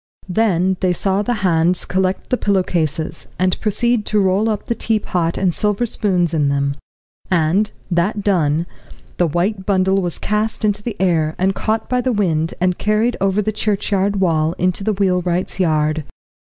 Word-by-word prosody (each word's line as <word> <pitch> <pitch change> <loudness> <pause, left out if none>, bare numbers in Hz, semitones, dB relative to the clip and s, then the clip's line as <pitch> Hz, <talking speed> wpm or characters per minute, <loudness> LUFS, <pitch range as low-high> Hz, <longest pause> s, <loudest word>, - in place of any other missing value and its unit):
Then 185 -2 +1
they 185 -1 +1
saw 195 +3 0
the 245 +3 -1
hands 170 0 +2
collect 185 +4 -1
the - - +4
pillow 200 -4 +1
cases, 160 -3 -2
and 185 -1 +1
proceed 225 +2 +1
to 210 - +2
roll 195 +3 +2
up 210 -2 -2
the - - 0
teapot 195 -7 -1
and 185 -2 +1
silver 210 +7 0
spoons 180 -7 0
in 150 -3 +2
them, 140 0 0 0.6
and, 185 +4 +2 0.2
that 190 +4 0
done, 165 -5 +1 0.5
the 175 - +2
white 190 +5 -1
bundle 190 0 +2
was 175 -2 -3
cast 215 +1 -1
into 205 -1 0
the 230 +1 -4
air, 160 -4 +1
and 190 +1 +1
caught 220 +2 -1
by 250 0 +1
the 255 - 0
wind 165 -7 0
and 180 0 0
carried 215 +3 +1
over 195 +2 +1
the 215 - 0
churchyard 205 -1 0
wall 160 -3 +1
into 185 +2 -1
the 215 +1 +1
wheelwright's 180 -2 0
yard. 155 -3 +1
190 Hz, 170 wpm, -19 LUFS, 170-210 Hz, 0.6 s, the